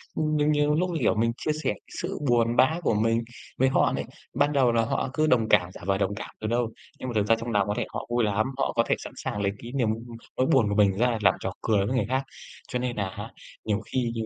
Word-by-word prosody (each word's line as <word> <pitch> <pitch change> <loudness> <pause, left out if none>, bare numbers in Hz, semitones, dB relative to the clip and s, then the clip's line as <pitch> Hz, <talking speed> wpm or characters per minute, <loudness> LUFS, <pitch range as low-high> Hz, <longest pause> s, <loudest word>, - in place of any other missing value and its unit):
Ừm, 155 -1 0
nhiều 150 - +2
nhiều 150 0 +3
lúc, 180 +3 +1
như 165 -3 -2
kiểu, 115 - +2
mình 115 +2 +2
chia 155 - -1
sẻ - - +1 0.3
sự 180 0 -4
buồn 120 0 +3
bã 155 +7 +4
của - - +2
mình 115 +2 +2 0.4
với 130 +1 +4
họ - - +3
này, - - -2 0.3
ban 145 +2 +2
đầu 130 -4 +4
là 115 0 +3
họ 130 - -1
cứ 155 0 +2
đồng 115 -5 +3
cảm, 90 0 +4
giả - - -11
vờ 95 0 +1
đồng 100 +1 -1
cảm - - -6
đâu 110 - -2
đâu. 120 -1 +1 0.3
Nhưng 130 - -4
mà - - -4
thực 105 -1 +2
ra 115 - +5
trong 115 +1 -5
nòng 100 -2 +2
có 105 - 0
thể - - 0
họ - - -4
vui 120 -1 +1
lắm, 105 +2 +1
họ 135 - 0
có 115 - +4
thể - - +3
sẵn - - -9
sàng 105 - -2
lấy 100 -1 +1
cái 120 - -7
niềm, 120 -5 +2
ưm 115 +1 -5 0.2
nỗi 130 - +3
buồn 125 -7 +4
của 100 - 0
mình 100 -2 +4
ra 120 0 +2
làm - - +5
trò - - -3
cười 105 -3 +2
với 130 +6 -1
người 105 - +1
khác. 130 +1 +1 0.4
Cho 125 - -2
nên 125 -1 -2
nà 100 -2 -1
á 95 - -7 0.3
nhiều 105 -1 +1
khi 125 -3 0
nhiều 115 - -2
115 Hz, 285 wpm, -26 LUFS, 110-130 Hz, 0.4 s, ra